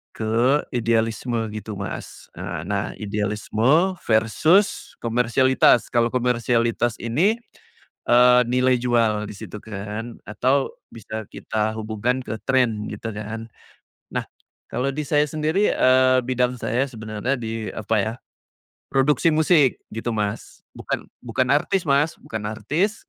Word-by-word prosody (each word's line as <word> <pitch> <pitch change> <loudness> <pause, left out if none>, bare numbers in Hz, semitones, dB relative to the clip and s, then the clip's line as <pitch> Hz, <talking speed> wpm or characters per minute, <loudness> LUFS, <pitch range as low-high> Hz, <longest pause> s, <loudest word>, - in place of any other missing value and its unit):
ke 120 +6 +2
idealisme 115 0 0
gitu, 110 0 -6
Mas. 100 - -7
Eee, - - -5
nah - - -1
idealisme 110 - +1
versus 115 - +2
komersialitas, 125 +1 +3
kalau 120 -1 +2
komersialitas 120 -1 +1
ini, 170 - +2 0.7
eee, 125 +1 +7
nilai 125 0 +3
jual 115 -3 +1
di - - -8
situ 105 - -8
kan, 105 +2 -6
atau 130 +7 +1 0.2
bisa 110 -1 -7
kita 110 0 -2
hubungkan 110 +4 -1
ke - - -4
trend, 120 -5 +1
gitu 110 +2 -5
kan. 110 +2 -6 0.7
Nah, - - -1 0.5
kalau 130 +2 0
di 150 - -2
saya 150 0 +3
sendiri, 155 +7 +1
eee, 130 0 +4
bidang 125 -1 +1
saya 125 +5 0
sebenarnya 110 +2 -3
di 115 -1 -4
apa 110 +1 -1
ya, 110 +3 -2 0.8
produksi 145 +4 +3
musik, 155 -4 +4 0.2
gitu, 115 +2 -3
Mas, 105 -1 -4
bukan - - -4 0.2
bukan 125 +2 0
artis, 185 +6 +1
Mas, 145 +4 +2
bukan 110 -1 -6
artis, 175 - -1
120 Hz, 125 wpm, -23 LUFS, 110-130 Hz, 0.8 s, eee